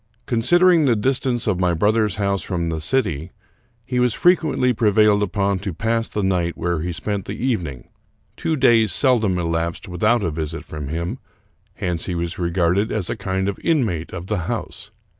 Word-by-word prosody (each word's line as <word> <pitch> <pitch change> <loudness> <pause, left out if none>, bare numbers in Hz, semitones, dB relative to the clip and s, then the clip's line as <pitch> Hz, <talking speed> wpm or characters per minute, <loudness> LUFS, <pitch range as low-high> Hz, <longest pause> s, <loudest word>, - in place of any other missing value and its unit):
Considering 170 +8 +4
the 125 -4 +3
distance 125 +1 0
of 100 -5 0
my 90 -2 +2
brother's 105 +2 +2
house 100 -2 0
from 85 -2 -2
the 80 -1 -3
city, 85 - -1 0.5
he 125 0 -1
was 125 -2 +2
frequently 160 -8 +3
prevailed 105 -2 +3
upon 100 -1 0
to 100 0 -4
pass 115 +3 0
the 105 - -3
night 90 -3 0
where 85 -1 -1
he 90 +2 -3
spent 100 +3 -3
the 100 - -5
evening. 90 - -3 0.5
Two 160 - -1
days 115 -6 +4
seldom 110 - +2
elapsed 85 0 -2
without 105 +6 +1
a 85 - 0
visit 80 +1 -4
from 75 -2 -6
him; 85 - -3 0.6
hence 90 -5 -3
he 90 - -2
was 85 +1 -3
regarded 90 +4 +1
as 105 -5 -2
a - - -2
kind 95 -2 -2
of 100 - -3
inmate 110 - 0
of 85 -1 -6
the 105 +2 -1
house. 110 -3 -5
100 Hz, 180 wpm, -21 LUFS, 85-115 Hz, 0.6 s, Considering